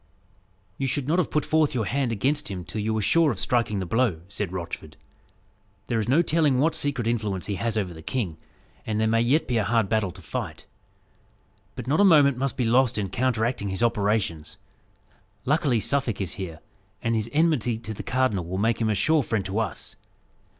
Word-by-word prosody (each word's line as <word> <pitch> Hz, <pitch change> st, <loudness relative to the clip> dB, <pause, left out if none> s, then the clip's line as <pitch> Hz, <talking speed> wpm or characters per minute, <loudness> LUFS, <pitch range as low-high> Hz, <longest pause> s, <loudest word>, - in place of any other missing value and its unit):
"You 135 Hz, -, 0 dB
should 130 Hz, +1 st, -1 dB
not 170 Hz, +4 st, +2 dB
have 180 Hz, -, 0 dB
put 150 Hz, -, 0 dB
forth 155 Hz, -3 st, +2 dB
your 115 Hz, -4 st, 0 dB
hand 130 Hz, +4 st, 0 dB
against 135 Hz, +5 st, 0 dB
him 90 Hz, -3 st, -5 dB
till 110 Hz, -, -4 dB
you 110 Hz, +1 st, -1 dB
were 110 Hz, -1 st, 0 dB
sure 165 Hz, +7 st, +4 dB
of 120 Hz, -, -2 dB
striking 120 Hz, -1 st, +1 dB
the 95 Hz, -, -2 dB
blow," 110 Hz, -4 st, +1 dB
said 100 Hz, -2 st, -3 dB
Rochford. 90 Hz, -3 st, -6 dB, 0.9 s
"There 115 Hz, -2 st, -1 dB
is 110 Hz, -, -2 dB
no 155 Hz, +6 st, +4 dB
telling 155 Hz, -5 st, +2 dB
what 155 Hz, +5 st, +2 dB
secret 140 Hz, -5 st, -1 dB
influence 105 Hz, -6 st, -1 dB
he 105 Hz, -, -3 dB
has 115 Hz, -1 st, 0 dB
over 95 Hz, -5 st, -1 dB
the 80 Hz, -, -11 dB
king; 90 Hz, -5 st, -3 dB, 0.5 s
and 110 Hz, -1 st, -2 dB
there 110 Hz, -, +2 dB
may 115 Hz, +1 st, +3 dB
yet 135 Hz, +7 st, +2 dB
be 125 Hz, -, 0 dB
a 110 Hz, -, +2 dB
hard 115 Hz, -2 st, +1 dB
battle 110 Hz, -3 st, +1 dB
to 95 Hz, -, -13 dB
fight. -, -, -5 dB, 1.1 s
But -, -, -6 dB
not 150 Hz, +9 st, +2 dB
a -, -, +6 dB
moment 145 Hz, -8 st, +6 dB
must 135 Hz, -1 st, -2 dB
be 125 Hz, -, +1 dB
lost 125 Hz, +1 st, +3 dB
in 100 Hz, -2 st, -1 dB
counteracting 120 Hz, -3 st, 0 dB
his 95 Hz, +5 st, -2 dB
operations. 105 Hz, -8 st, 0 dB, 0.9 s
Luckily, 140 Hz, -4 st, +2 dB
Suffolk 130 Hz, -3 st, 0 dB
is 95 Hz, -4 st, -3 dB
here, 85 Hz, -6 st, -7 dB, 0.4 s
and 115 Hz, -, +1 dB
his 110 Hz, 0 st, -1 dB
enmity 145 Hz, -7 st, +2 dB
to 110 Hz, -1 st, -6 dB
the -, -, -6 dB
cardinal 125 Hz, -9 st, 0 dB
will 95 Hz, +2 st, -3 dB
make 115 Hz, +4 st, +1 dB
him 110 Hz, -, +2 dB
a 105 Hz, -, +1 dB
sure 155 Hz, +10 st, +3 dB
friend 110 Hz, -6 st, -2 dB
to 95 Hz, +3 st, -2 dB
us. 115 Hz, -, -4 dB
115 Hz, 205 wpm, -25 LUFS, 105-135 Hz, 1.1 s, a